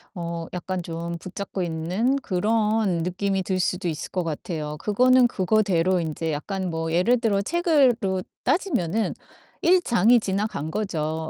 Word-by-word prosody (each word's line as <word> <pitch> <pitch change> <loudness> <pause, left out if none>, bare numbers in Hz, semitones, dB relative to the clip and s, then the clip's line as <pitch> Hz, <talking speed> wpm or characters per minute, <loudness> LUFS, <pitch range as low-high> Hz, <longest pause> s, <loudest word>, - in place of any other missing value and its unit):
어 170 -1 -4
약간 185 +1 -3
좀 170 0 -5
붙잡고 190 +2 -6
있는 175 +10 0
그런 215 -3 +1
느낌이 190 +2 -1
들 185 0 -1
수도 180 0 -1
있을 155 - -5
것 180 - -1
같아요. 155 -1 -4
그거는 250 +7 +4
그거대로 185 -3 +2
인제 160 0 -3
약간 185 +5 -3
뭐 165 -1 -3
예를 205 +9 +3
들어 210 -4 +1
책으로 250 - +2 0.2
따지면은 225 - 0 0.5
1 365 +1 +5
장이 235 - +4
지나간 195 -6 -2
거죠. 160 -5 -2
185 Hz, 280 characters per minute, -24 LUFS, 170-220 Hz, 0.5 s, 1